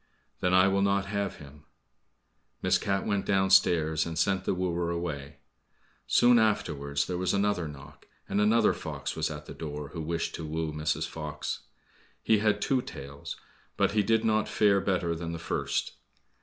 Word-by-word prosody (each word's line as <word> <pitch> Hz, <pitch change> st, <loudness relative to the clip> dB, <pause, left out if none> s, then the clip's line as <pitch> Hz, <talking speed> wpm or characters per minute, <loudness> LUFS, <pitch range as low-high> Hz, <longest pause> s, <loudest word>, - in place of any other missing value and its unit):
"Then 90 Hz, -, +1 dB
I 95 Hz, +1 st, +6 dB
will 100 Hz, 0 st, +2 dB
not 100 Hz, 0 st, +2 dB
have 100 Hz, -1 st, -2 dB
him." 75 Hz, +1 st, -14 dB, 1.0 s
Miss -, -, +3 dB
Cat 95 Hz, -1 st, -1 dB
went 100 Hz, -2 st, 0 dB
downstairs 90 Hz, -5 st, +3 dB
and 80 Hz, -1 st, -5 dB
sent 95 Hz, +3 st, +1 dB
the -, -, +1 dB
wooer 90 Hz, -2 st, -1 dB
away. 80 Hz, -4 st, -4 dB, 0.7 s
Soon 120 Hz, 0 st, +5 dB
afterwards 70 Hz, -10 st, 0 dB
there 90 Hz, -1 st, -3 dB
was 90 Hz, +1 st, +1 dB
another 100 Hz, -4 st, +1 dB
knock, 70 Hz, 0 st, -12 dB, 0.2 s
and 105 Hz, -, +1 dB
another 110 Hz, +1 st, +4 dB
fox -, -, -5 dB
was -, -, -1 dB
at -, -, -7 dB
the -, -, -8 dB
door 75 Hz, -2 st, -6 dB
who 85 Hz, -, -6 dB
wished 85 Hz, +1 st, -2 dB
to 85 Hz, -, -6 dB
woo 80 Hz, 0 st, -3 dB
Mrs. 75 Hz, 0 st, -1 dB
Fox. 75 Hz, -1 st, -5 dB, 0.6 s
He 110 Hz, -2 st, +4 dB
had 105 Hz, -1 st, +1 dB
two 130 Hz, -2 st, +2 dB
tails, 70 Hz, -, -8 dB, 0.4 s
but -, -, +2 dB
he 105 Hz, +1 st, +3 dB
did 110 Hz, +2 st, +2 dB
not 110 Hz, -1 st, +2 dB
fare 100 Hz, -2 st, +3 dB
better 90 Hz, -4 st, 0 dB
than 85 Hz, 0 st, -4 dB
the -, -, -4 dB
first. 80 Hz, -, -2 dB
90 Hz, 170 wpm, -29 LUFS, 80-100 Hz, 1.0 s, I